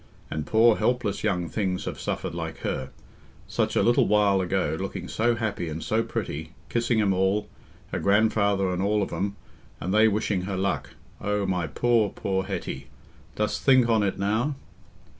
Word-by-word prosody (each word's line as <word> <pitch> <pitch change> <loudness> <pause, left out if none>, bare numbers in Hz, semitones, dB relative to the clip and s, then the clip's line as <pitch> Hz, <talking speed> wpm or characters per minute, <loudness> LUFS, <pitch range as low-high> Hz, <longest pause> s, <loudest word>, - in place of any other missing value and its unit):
and 75 -1 -3
poor 115 0 +5
helpless 110 -2 0
young 90 -5 0
things 95 -1 -2
have - - -5
suffered - - -3
like - - -4
her.... 65 - -3 0.6
Such - - -1
a - - +3
little 120 +1 +4
while 100 -2 +4
ago 90 -2 0
looking 95 -1 -4
so 120 +2 +1
happy 110 -7 -2
and 80 +1 -5
so 110 +1 +1
pretty... 80 -7 -4 0.2
kissing 120 -1 +1
'em 100 -3 +3
all, 95 +3 +1 0.4
her - - -1
grandfather 100 -2 +2
and 90 0 -1
all 105 +1 +2
of - - -5
'em, 100 +1 -2 0.4
and 90 +5 -2
they 110 +1 +6
wishing 105 -3 0
her 95 -1 -3
luck.... 80 -9 -2 0.3
O 105 -1 0
my 90 -4 -1
poor, 115 - +2
poor 95 0 -2
Hetty... 70 +1 -5 0.5
dost 105 0 -1
think 130 -3 +5
on 110 -2 +4
it 100 -2 0
now?" 110 +9 0
100 Hz, 175 wpm, -26 LUFS, 95-110 Hz, 0.6 s, they